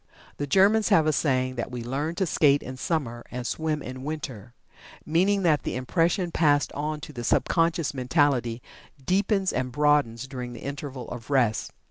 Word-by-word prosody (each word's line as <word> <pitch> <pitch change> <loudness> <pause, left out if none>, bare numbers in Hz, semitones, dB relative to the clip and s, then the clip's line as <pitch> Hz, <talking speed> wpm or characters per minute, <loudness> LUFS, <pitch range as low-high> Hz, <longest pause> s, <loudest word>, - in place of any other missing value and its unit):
The 145 - -3
Germans 200 +7 +4
have 160 - +5
a 155 - +2
saying 130 -3 0
that 120 - -3
"we 120 -1 -5
learn 145 +7 -2
to 190 - 0
skate 145 -4 +3
in 130 - -7
summer, 130 -5 -2
and 125 0 -5
to - - -1
swim 155 -2 -2
in 130 +1 -7
winter," 130 -7 -6 0.5
meaning 190 +5 +2
that 155 -5 +3
the - - -4
impression 170 +7 0
passed 145 -4 +2
on 150 +1 -3
to 150 -1 -9
the 120 -2 -6
subconscious 165 +4 +1
mentality 125 -3 +1 0.4
deepens 195 0 +1
and 130 0 -2
broadens 145 -4 +2
during 125 -2 -6
the 120 - -10
interval 140 -2 -6
of 120 0 -8
rest. 120 -6 +1
145 Hz, 175 wpm, -26 LUFS, 125-165 Hz, 0.5 s, have